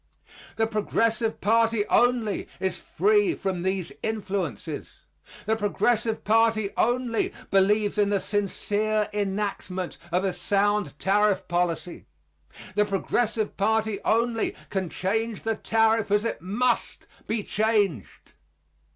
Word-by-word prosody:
The 225 Hz, -, +2 dB
Progressive 225 Hz, +1 st, 0 dB
party 225 Hz, 0 st, +3 dB
only 240 Hz, -3 st, +2 dB
is 190 Hz, 0 st, -2 dB
free 415 Hz, -4 st, +2 dB
from 190 Hz, -3 st, -3 dB
these 190 Hz, -1 st, -2 dB
influences. 195 Hz, -, -4 dB, 0.4 s
The 220 Hz, +1 st, +2 dB
Progressive 220 Hz, +1 st, 0 dB
party 220 Hz, -1 st, +3 dB
only 240 Hz, 0 st, +1 dB, 0.2 s
believes 205 Hz, +2 st, +3 dB
in 205 Hz, -1 st, +3 dB
the 200 Hz, -1 st, +2 dB
sincere 210 Hz, +1 st, -1 dB
enactment 195 Hz, -2 st, -3 dB
of 180 Hz, +2 st, +1 dB
a 190 Hz, -2 st, 0 dB
sound 205 Hz, -7 st, 0 dB
tariff 195 Hz, 0 st, +2 dB
policy. 175 Hz, 0 st, -2 dB, 0.7 s
The 210 Hz, +1 st, +3 dB
Progressive 210 Hz, +2 st, -1 dB
party 220 Hz, 0 st, +1 dB
only 230 Hz, 0 st, +1 dB, 0.2 s
can 190 Hz, -3 st, -1 dB
change 220 Hz, +5 st, -2 dB
the 225 Hz, -, 0 dB
tariff 225 Hz, 0 st, +2 dB
as 205 Hz, +2 st, +2 dB
it -, -, -3 dB
must 235 Hz, +7 st, -1 dB, 0.2 s
be 220 Hz, -1 st, -1 dB
changed. 205 Hz, -, -1 dB
210 Hz, 115 wpm, -26 LUFS, 195-225 Hz, 0.7 s, party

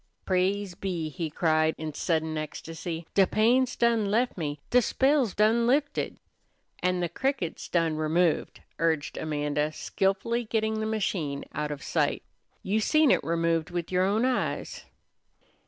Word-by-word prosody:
"Praise 190 Hz, +1 st, 0 dB
be!" 175 Hz, -3 st, -3 dB
he 160 Hz, +2 st, -4 dB
cried 155 Hz, 0 st, +2 dB
in 155 Hz, -1 st, -5 dB
sudden 160 Hz, -1 st, -1 dB
ecstasy. 165 Hz, +2 st, -5 dB
"De 195 Hz, -2 st, +5 dB
pain's 245 Hz, +4 st, +3 dB
done 230 Hz, -3 st, +2 dB
lef 240 Hz, +5 st, +1 dB
me, 150 Hz, -4 st, -4 dB
do 250 Hz, -, +6 dB
spell's 265 Hz, -1 st, +2 dB
done 225 Hz, +3 st, +3 dB
lifted!" 285 Hz, +3 st, 0 dB, 0.6 s
"An' 180 Hz, 0 st, +1 dB
the 175 Hz, -, +1 dB
cricket's 255 Hz, -, -2 dB
done 165 Hz, -2 st, +1 dB
removed," 160 Hz, +2 st, +1 dB, 0.2 s
urged 160 Hz, -2 st, 0 dB
Amanda, 150 Hz, 0 st, -1 dB
skilfully 195 Hz, +8 st, -1 dB
getting 220 Hz, 0 st, 0 dB
the 220 Hz, -, -1 dB
machine 180 Hz, -10 st, -2 dB
out 150 Hz, 0 st, -2 dB
of 145 Hz, -1 st, -6 dB
sight. -, -, 0 dB, 0.4 s
"You 205 Hz, +3 st, +1 dB
seen 310 Hz, +5 st, +4 dB
it -, -, +3 dB
removed 165 Hz, 0 st, 0 dB
with 175 Hz, -1 st, -4 dB
yer 180 Hz, 0 st, +2 dB
own 210 Hz, +5 st, +2 dB
eyes." 260 Hz, -1 st, -2 dB
180 Hz, 145 wpm, -27 LUFS, 160-220 Hz, 0.6 s, do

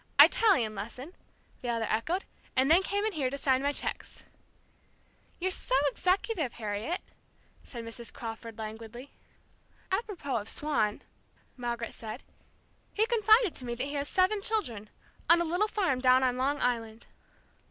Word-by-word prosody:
"Italian 305 Hz, -, +6 dB
lesson," 250 Hz, -, -7 dB, 0.5 s
the 245 Hz, -, -3 dB
other 230 Hz, -1 st, 0 dB
echoed, 325 Hz, -, -1 dB, 0.3 s
"and 265 Hz, +3 st, +3 dB
then 345 Hz, +3 st, +7 dB
came 405 Hz, +2 st, -1 dB
in 435 Hz, -, +1 dB
here 280 Hz, -8 st, -1 dB
to 280 Hz, -, -4 dB
sign 265 Hz, -2 st, +2 dB
my 285 Hz, +1 st, +1 dB
cheques." -, -, -5 dB, 1.1 s
"You're 375 Hz, +1 st, -1 dB
so 260 Hz, -, 0 dB, 0.2 s
executive, 365 Hz, -, 0 dB
Harriet!" 220 Hz, -, -3 dB, 0.6 s
said 235 Hz, -3 st, -8 dB
Mrs. 230 Hz, +1 st, -6 dB
Crawford, 225 Hz, -1 st, -7 dB
languidly. 225 Hz, +4 st, -8 dB, 0.8 s
"Apropos 380 Hz, -, -2 dB
of 210 Hz, 0 st, -5 dB
Swann," 285 Hz, -9 st, -1 dB, 0.5 s
Margaret 235 Hz, -2 st, -4 dB
said, 220 Hz, +3 st, -7 dB, 0.7 s
"he 430 Hz, -, +4 dB
confided 445 Hz, -3 st, +4 dB
to -, -, -7 dB
me 240 Hz, -1 st, -3 dB
that 250 Hz, -, -2 dB
he 285 Hz, -, -5 dB
has 285 Hz, 0 st, -2 dB
seven 385 Hz, +2 st, +2 dB
children 245 Hz, -, -1 dB, 0.4 s
on 340 Hz, +1 st, +7 dB
a 345 Hz, -, +1 dB
little 355 Hz, +6 st, +1 dB
farm 370 Hz, -12 st, 0 dB
down 255 Hz, 0 st, +5 dB
on 250 Hz, -1 st, +2 dB
Long 275 Hz, +3 st, 0 dB
Island." 230 Hz, -2 st, -1 dB
265 Hz, 150 wpm, -30 LUFS, 230-365 Hz, 1.1 s, then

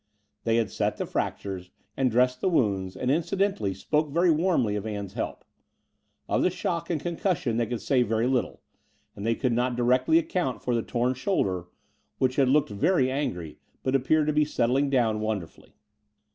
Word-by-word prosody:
They 115 Hz, 0 st, +2 dB
had 115 Hz, -3 st, +1 dB
set -, -, -1 dB
the -, -, -2 dB
fractures 95 Hz, -2 st, -3 dB, 0.3 s
and 130 Hz, -1 st, +2 dB
dressed 125 Hz, +2 st, +2 dB
the -, -, +2 dB
wounds, 100 Hz, -, 0 dB
and 125 Hz, -, 0 dB
incidentally 165 Hz, -, 0 dB
spoke 150 Hz, +10 st, 0 dB
very 170 Hz, +4 st, +3 dB
warmly 155 Hz, -, +2 dB
of 105 Hz, +1 st, -3 dB
Ann's 100 Hz, -3 st, -5 dB
help. -, -, -4 dB, 0.8 s
Of -, -, +1 dB
the -, -, +3 dB
shock 170 Hz, -2 st, -3 dB
and 165 Hz, -3 st, 0 dB
con 170 Hz, +2 st, -4 dB
cussion 150 Hz, -, 0 dB
they 115 Hz, -, +1 dB
could 120 Hz, -2 st, -4 dB
say 135 Hz, -3 st, +2 dB
very 115 Hz, -1 st, +1 dB
little; 130 Hz, 0 st, -1 dB, 0.5 s
and 100 Hz, -, -7 dB
th^ 115 Hz, -, 0 dB
could 130 Hz, -3 st, +1 dB
not 125 Hz, +1 st, 0 dB
directly 125 Hz, +6 st, +3 dB
accotmt 170 Hz, -5 st, -2 dB
for 125 Hz, -, 0 dB
the 115 Hz, -, +1 dB
torn 125 Hz, +2 st, 0 dB
shoulder, 100 Hz, -, -1 dB, 0.5 s
which 130 Hz, -1 st, 0 dB
had 135 Hz, -2 st, +4 dB
looked 145 Hz, -4 st, +3 dB
very 130 Hz, -, +2 dB
angry, 90 Hz, -, -3 dB, 0.2 s
but 130 Hz, -, 0 dB
appeared 145 Hz, +4 st, +3 dB
to 150 Hz, -, +1 dB
be 150 Hz, 0 st, +4 dB
settling 140 Hz, -1 st, +1 dB
down 115 Hz, -5 st, +2 dB
wonderfully. 105 Hz, -6 st, -5 dB
125 Hz, 185 wpm, -27 LUFS, 110-150 Hz, 0.8 s, had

